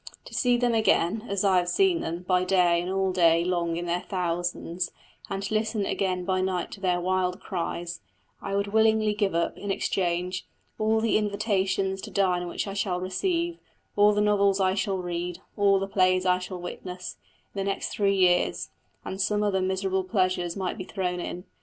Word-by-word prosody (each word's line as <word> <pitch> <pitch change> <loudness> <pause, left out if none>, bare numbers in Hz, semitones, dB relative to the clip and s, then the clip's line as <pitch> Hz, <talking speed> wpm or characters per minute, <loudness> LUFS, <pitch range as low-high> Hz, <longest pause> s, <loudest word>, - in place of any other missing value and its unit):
To - - -12
see 245 -2 +3
them 240 -1 +1
again, 220 0 +2
as 200 0 0
I 195 -2 +4
have 175 -1 +1
seen 370 - +3
them, 170 +2 -4
by 180 0 +2
day 180 -2 +3
and 180 +1 -4
all 190 0 +1
day 170 -2 +4
long 170 -2 0
in 175 - -3
their 175 +1 -1
thousands, 175 -1 -2 0.4
and 195 0 -3
to 200 - -3
listen 215 -1 0
again 185 -2 -1
by 185 0 +1
night 185 -2 -1
to - - -9
their 180 -2 +1
wild 185 +1 0
cries, 175 -2 -4 0.4
I 195 - -3
would 200 0 +1
willingly 220 -1 +4
give 205 -4 0
up, 170 - 0
in 205 - -5
exchange, 180 -1 -1 0.3
all 220 +1 +2
the 225 -1 +3
invitations 195 -2 0
to - - -7
dine 180 -3 +1
which - - -3
I 195 - -5
shall 190 -3 -1
receive, 335 - -1 0.4
all 205 0 +6
the 210 0 +1
novels 200 -1 +3
I 190 -1 +3
shall 195 0 -1
read, 175 -1 -3 0.2
all 200 -1 +4
the 195 - -1
plays 185 -1 +2
I 180 0 +3
shall 185 0 -6
witness, 180 0 -7 0.4
in 200 - -5
the - - 0
next 195 - -3
three 200 -1 +1
years; 180 -2 +2 0.4
and 190 +1 -4
some 210 +1 +1
other 195 -2 +1
miserable 190 0 0
pleasures 185 -3 0
might 190 +2 -3
be - - -3
thrown 180 -2 -3
in. 175 0 -5
190 Hz, 195 wpm, -27 LUFS, 180-200 Hz, 0.4 s, all